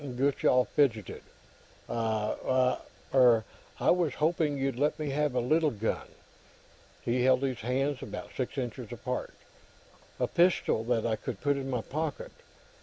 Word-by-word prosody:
Gutchall 130 -1 +2
fidgeted. 115 - 0 0.6
"Why, 115 +3 0 0.3
er, 120 -4 +6 0.4
I - - +4
was 175 -3 +1
hoping 155 -2 +1
you'd 135 -2 -1
let 150 +1 +1
me 150 -2 -3
have 145 -1 0
a - - +3
little 155 +6 +2
gun." 110 -3 -3 1.0
He 120 +1 +1
held 130 +1 +4
his 130 -3 -1
hands 135 +4 -1
about - - -7
six 130 +2 -3
inches 125 -2 -4
apart. 125 +2 -4 0.8
"A - - +2
pistol, 170 -10 +2
that 115 -2 +1
I 110 -2 0
could - - -5
put 145 -1 +1
in 135 -1 -4
my 125 -3 -1
pocket. 150 +4 -4
130 Hz, 145 wpm, -30 LUFS, 120-145 Hz, 1.0 s, er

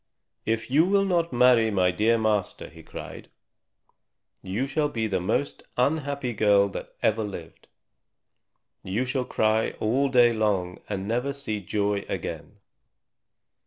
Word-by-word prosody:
"If 115 +2 -1
you 150 +4 +5
will 195 +2 +2
not 170 -3 +1
marry 120 -2 +5
my 95 -3 +2
dear 110 +5 +2
master," 110 -3 -1
he 80 +4 -14
cried, - - -9 1.1
"you 100 +8 -2
shall 150 +2 0
be 115 -5 -2
the 95 -4 0
most 115 +10 -1 0.2
unhappy 140 -1 0
girl 100 -2 +3
that - - -8
ever 110 0 +2
lived. 90 -6 -9 1.2
You 105 +7 -1
shall 125 0 -2
cry 110 -1 +1
all 130 +6 +1
day 120 -2 +5
long 100 -5 -1
and 100 -1 -3
never 125 +5 -1
see 110 -7 -4
joy 100 +1 -1
again. - - -5
110 Hz, 135 wpm, -26 LUFS, 100-135 Hz, 1.2 s, you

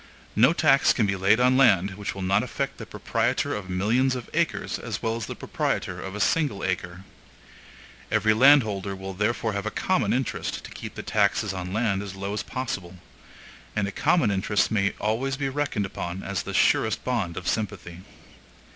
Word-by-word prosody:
No 120 +8 +6
tax 155 -5 +4
can 115 - +1
be 100 -1 0
laid 95 +4 +3
on 125 +1 +4
land 100 -8 +4
which 100 0 -5
will 95 - -5
not 95 +2 +2
affect - - -4
the - - -7
proprietor - - -1
of 100 -3 -5
millions 115 +8 +1
of 125 -2 -7
acres 170 +1 -1
as - - -5
well 115 0 0
as 115 -2 -5
the - - -5
proprietor 90 -1 -2
of 95 +2 -6
a - - -5
single 140 -2 +1
acre. 90 0 -3 1.1
Every 110 +1 +3
landholder 110 -6 +4
will 95 0 -7
therefore 105 +3 -1
have 100 -1 -3
a - - +1
common - - 0
interest - - -2
to - - -10
keep - - -8
the - - -6
taxes - - +1
on 90 -1 -5
land 100 -2 0
as 100 -2 -7
low 100 +1 -4
as 105 - -2
possible; 95 -9 -5 0.8
and 100 -2 -1
common 165 -12 +3
interest 100 +1 +1
may 100 -2 +1
always 125 +6 -1
be 135 -1 -1
reckoned 135 -7 -1
upon 90 0 -5
as 100 -3 -2
the - - -6
surest 110 -1 +2
bond 110 -10 -2
of 85 - -5
sympathy. 100 -5 -3
105 Hz, 185 wpm, -25 LUFS, 95-120 Hz, 1.1 s, No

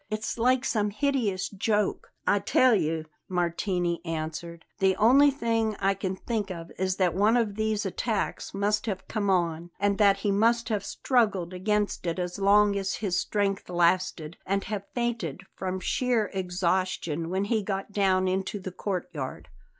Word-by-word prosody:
It's 215 +2 -3
like 255 +2 +3
some 210 -4 +1
hideous 225 -5 0
joke." 210 0 -1
"I 205 - +3
tell 245 +5 +4
you," 160 -5 0 0.2
Martini 175 0 -1
answered, 165 +1 -5
"the 190 -1 +3
only 265 +7 +6
thing 230 -5 0
I 195 +1 +2
can 190 -1 -3
think 210 0 -3
of 170 -2 -7
is 185 0 0
that 180 -4 +2
one 210 +6 +3
of 225 -4 +1
these 215 0 -1
attacks 210 +3 -2
must 205 +3 0
have 190 -3 -3
come 210 -3 -1
on, 170 -2 0
and 200 +1 +1
that 200 -2 +5
he 205 - +3
must 230 +4 +2
have 210 -3 -1
struggled 200 -9 0
against 205 0 -1
it 170 - -1
as 180 +1 -3
long 200 +1 +5
as 195 0 -1
his 195 -5 -2
strength 200 -3 -1
lasted 175 -2 +1
and 195 +1 -1
have 200 -1 -5
fainted 230 - -2
from 185 0 -3
sheer 235 +3 0
exhaustion 180 -3 -1
when 190 +2 0
he 215 +1 +1
got 195 0 -4
down 190 -2 +2
into 190 +2 -1
the 185 -1 -6
courtyard." 180 -8 -5
195 Hz, 165 wpm, -27 LUFS, 180-215 Hz, 0.2 s, only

